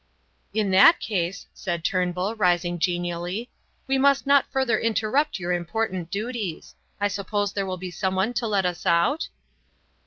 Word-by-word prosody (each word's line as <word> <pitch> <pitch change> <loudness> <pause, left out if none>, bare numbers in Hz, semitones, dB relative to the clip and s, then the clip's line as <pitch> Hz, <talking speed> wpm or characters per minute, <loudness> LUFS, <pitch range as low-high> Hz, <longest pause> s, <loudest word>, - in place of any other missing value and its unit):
"In 210 -3 0
that 195 - +7
case," 190 -2 -2
said 170 -4 -4
Turnbull, 180 +3 0
rising 175 -3 +1
genially, 175 +5 -2 0.3
"we 270 -1 +1
must 280 0 +3
not 280 0 +4
further 265 -3 +1
interrupt 230 +7 +1
your 180 -1 -3
important 180 0 -2
duties. 210 -4 -4 0.3
I 205 - +2
suppose 205 0 -2
there 195 -1 -2
will 185 -1 -3
be 180 0 -6
someone 190 +5 -1
to 235 0 -1
let 200 -3 +1
us 175 -1 -2
out?" 170 - +2
195 Hz, 150 wpm, -25 LUFS, 175-225 Hz, 0.3 s, that